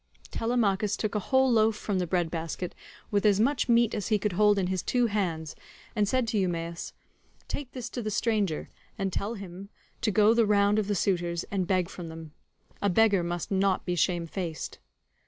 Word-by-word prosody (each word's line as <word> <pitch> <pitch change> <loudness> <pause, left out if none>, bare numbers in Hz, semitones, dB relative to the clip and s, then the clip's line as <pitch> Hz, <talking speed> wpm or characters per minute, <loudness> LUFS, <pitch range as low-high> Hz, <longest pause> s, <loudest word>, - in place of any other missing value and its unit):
Telemachus 210 -4 +1
took 215 - -2
a 210 - +1
whole 265 +4 +3
loaf 220 -1 +4
from 205 -2 -2
the 180 - -1
bread 175 -2 0
basket, 165 +1 -4 0.4
with 205 -1 +2
as 205 -2 +4
much 255 +3 +1
meat 235 -1 +4
as 210 -3 -2
he 215 - +3
could 210 +1 -1
hold 210 +2 +4
in 190 - +1
his 185 -1 -1
two 245 -1 +1
hands, 175 -8 -2 0.4
and 210 -2 +2
said 255 +2 +1
to 220 -2 0
Eumaeus, 170 -2 -3 0.5
"Take 280 -3 -5
this 250 -2 -5
to 245 - -4
the 215 - -2
stranger, 205 -5 0 0.3
and 195 -3 -2
tell 210 +4 -2
him 195 -1 -9 0.3
to 220 - +1
go 215 +1 +5
the 230 -2 +3
round 205 0 +4
of 210 - -1
the 205 - 0
suitors, 175 -2 0
and 190 -3 -1
beg 185 -2 +2
from 175 -1 -8
them; 160 -1 -9 0.5
a 205 - +2
beggar 200 0 +4
must 175 +1 -3
not 195 -1 +1
be 180 - -1
shamefaced." 170 -1 -2
200 Hz, 195 wpm, -28 LUFS, 175-215 Hz, 0.5 s, go